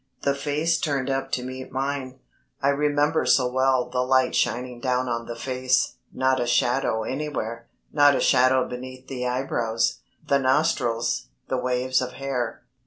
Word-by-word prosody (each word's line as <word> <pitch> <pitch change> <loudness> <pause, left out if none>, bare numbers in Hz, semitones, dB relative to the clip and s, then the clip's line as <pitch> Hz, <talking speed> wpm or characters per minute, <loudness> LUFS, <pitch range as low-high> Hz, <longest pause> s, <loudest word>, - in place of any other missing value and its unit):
The 140 - +2
face 150 +4 0
turned 140 -3 -1
up 135 0 -2
to 125 - 0
meet 130 +1 -7
mine. 135 -1 -3 0.4
I 140 - +2
remember 145 +2 +2
so 130 - +4
well 130 0 +2
the 125 0 -1
light 130 +1 +2
shining 125 0 -1
down 125 0 0
on 115 -1 -3
the 120 - -5
face, 130 +1 0
not 130 0 +1
a 120 - -1
shadow 120 -1 +1
anywhere, 115 -4 -4 0.3
not 145 -1 +6
a - - +1
shadow 130 +1 +4
beneath 130 +1 -8
the 125 -2 -3
eyebrows, 120 -3 0 0.3
the 140 - +3
nostrils, 130 - +1 0.2
the 130 - 0
waves 125 +1 +1
of 125 0 -4
hair. 130 -4 -3
130 Hz, 160 wpm, -25 LUFS, 125-135 Hz, 0.4 s, not